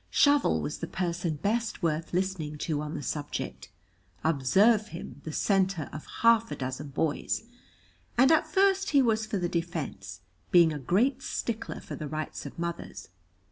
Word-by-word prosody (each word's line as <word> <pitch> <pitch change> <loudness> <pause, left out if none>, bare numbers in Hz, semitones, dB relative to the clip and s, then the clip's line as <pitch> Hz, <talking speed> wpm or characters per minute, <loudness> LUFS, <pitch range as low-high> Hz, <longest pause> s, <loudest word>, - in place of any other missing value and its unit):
Shovel 285 0 +4
was 150 - -4
the - - -4
person 175 -3 -2
best 215 +6 -1
worth 160 0 0
listening 180 -5 -2
to 150 -1 -2
on 150 +1 -5
the 145 - -5
subject 145 +2 -4 0.5
(observe 190 - +4
him, 165 -6 -9
the 160 - -4
centre 190 -2 +1
of 155 - -8
half 230 -1 +5
a - - -4
dozen 130 +2 -4
boys), 145 +7 -1 0.7
and 260 +4 +6
at 315 -1 +4
first 390 +3 +3
he 280 -2 +5
was 220 -2 +1
for 215 - -1
the 175 -2 0
defence, 150 - -4 0.3
being 170 -3 +6
a 150 - -4
great 205 - +2
stickler 230 -1 -4
for - - -7
the 155 - -5
rights 155 +1 -5
of - - -11
mothers. 170 0 -5
170 Hz, 165 wpm, -28 LUFS, 150-220 Hz, 0.7 s, and